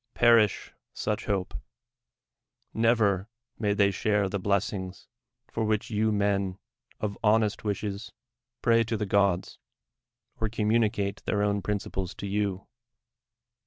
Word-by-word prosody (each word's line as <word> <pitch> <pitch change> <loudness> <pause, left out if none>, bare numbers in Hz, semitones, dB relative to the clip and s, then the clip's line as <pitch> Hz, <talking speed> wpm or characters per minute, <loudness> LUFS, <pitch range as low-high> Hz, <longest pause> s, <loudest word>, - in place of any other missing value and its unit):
Pei'ish 115 -4 +4 0.2
such - - -2
hon.'l 95 -3 0 1.3
Xevef 110 -4 +2 0.3
nuay 105 -2 0
they 100 -1 +4
share 105 +1 +1
the 100 +1 -2
blessings 95 -1 -2 0.4
for 115 - -1
wliich 110 +1 0
you 110 +1 +2
mm 100 -2 0 0.4
of 105 -2 -3
honest 105 -1 +2
wishes 105 0 -3 0.5
pray 115 -1 +4
to 115 0 -2
the 105 - -1
go.ls, 100 -2 +1 0.8
or 110 - 0
eonnnuni 110 0 +2
cat<' 100 -1 -3
their 105 -1 +1
own 100 -1 +1
principles 95 -2 -3
to - - -6
you 100 -1 -1
105 Hz, 125 wpm, -28 LUFS, 100-110 Hz, 1.3 s, Pei'ish